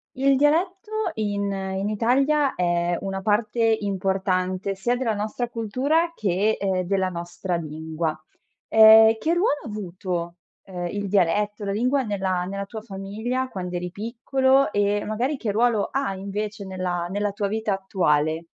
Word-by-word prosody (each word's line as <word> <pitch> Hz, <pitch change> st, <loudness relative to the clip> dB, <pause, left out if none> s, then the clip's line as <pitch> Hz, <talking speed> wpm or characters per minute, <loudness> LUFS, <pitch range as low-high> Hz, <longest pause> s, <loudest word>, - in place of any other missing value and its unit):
Il 275 Hz, +1 st, +3 dB
dialetto, 375 Hz, -, +1 dB
in 205 Hz, -2 st, -1 dB
in 195 Hz, +1 st, -3 dB
Italia, 270 Hz, +7 st, +2 dB
è 175 Hz, -1 st, 0 dB
una 195 Hz, 0 st, -4 dB
parte 225 Hz, +2 st, +2 dB
importante, 190 Hz, -1 st, -1 dB
sia 240 Hz, +6 st, 0 dB
della 240 Hz, -3 st, -1 dB
nostra 215 Hz, +4 st, -3 dB
cultura 265 Hz, +10 st, 0 dB
che, 205 Hz, -, +1 dB
ehm, 190 Hz, -2 st, 0 dB
della 190 Hz, 0 st, 0 dB
nostra 175 Hz, +1 st, -4 dB
lingua. 160 Hz, 0 st, -3 dB, 0.5 s
Ehm, 220 Hz, 0 st, +8 dB
che 325 Hz, +6 st, +1 dB
ruolo 345 Hz, -5 st, +1 dB
ha -, -, -8 dB
avuto, 180 Hz, -4 st, -4 dB, 0.3 s
ehm, 180 Hz, -2 st, -5 dB
il 205 Hz, +3 st, -3 dB
dialetto, 205 Hz, +2 st, +1 dB
la 200 Hz, -, -2 dB
lingua 250 Hz, +7 st, +1 dB
nella 190 Hz, -4 st, -1 dB
nella 200 Hz, +2 st, -4 dB
tua 220 Hz, +2 st, -8 dB
famiglia 215 Hz, +5 st, -3 dB
quando 180 Hz, -6 st, -5 dB
eri 175 Hz, 0 st, -4 dB
piccolo, 260 Hz, +4 st, +1 dB
e 205 Hz, 0 st, +1 dB
magari 245 Hz, +7 st, -1 dB
che 215 Hz, -5 st, -2 dB
ruolo 225 Hz, -1 st, +2 dB
ha 270 Hz, -7 st, -1 dB
invece, 205 Hz, +2 st, -4 dB
nella 185 Hz, -2 st, -3 dB
nella 205 Hz, +2 st, -1 dB
tua 200 Hz, 0 st, -2 dB
vita 215 Hz, 0 st, -1 dB
attuale? 160 Hz, -5 st, 0 dB
205 Hz, 150 wpm, -24 LUFS, 185-235 Hz, 0.5 s, Ehm